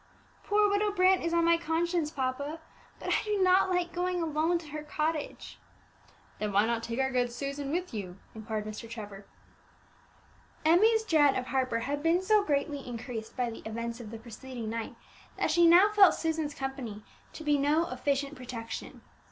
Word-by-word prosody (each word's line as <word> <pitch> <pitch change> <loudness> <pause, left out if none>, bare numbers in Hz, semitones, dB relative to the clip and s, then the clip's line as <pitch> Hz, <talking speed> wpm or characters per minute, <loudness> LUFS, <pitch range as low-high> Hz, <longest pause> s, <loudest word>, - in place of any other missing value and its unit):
Poor 415 0 +3
Widow 410 +1 +1
Brant 375 -1 +4
is 335 - -1
on 335 0 +2
my 335 0 +5
conscience, 335 0 0
papa; 280 +2 -3 0.4
but - - -6
I - - +1
do 420 -1 -1
not 375 0 +4
like 360 -1 0
going 360 0 -1
alone 325 +1 +1
to 330 -3 -10
her 305 +1 -5
cottage." 305 0 -3 0.8
"Then 210 -1 -2
why 200 +2 +4
not 230 0 0
take 230 0 -4
our 265 0 +1
good 245 -1 +1
Susan 275 +2 -4
with 355 +1 -2
you?" 190 -4 -5 0.2
inquired 220 -1 -4
Mr. 215 +2 -7
Trevor. 205 -3 -8 1.4
Emmie's 435 +8 +5
dread 300 -8 +4
of 255 - -2
Harper 255 -3 0
had 285 +4 -2
been 335 +4 +2
so 425 +1 +4
greatly 290 -2 -1
increased 240 -3 -7
by 245 -2 0
the 225 - -8
events 230 +2 -5
of 230 -3 -8
the 225 - -7
preceding 235 0 -7
night, 230 -1 -4 0.4
that - - +1
she 340 +1 +5
now 365 +5 +7
felt 405 -3 +6
Susan's 320 -3 -2
company 260 -6 -5 0.3
to 315 - -8
be 295 -1 +2
no 305 +4 +2
efficient 280 0 -1
protection. 240 -4 -7
290 Hz, 175 wpm, -29 LUFS, 235-340 Hz, 1.4 s, now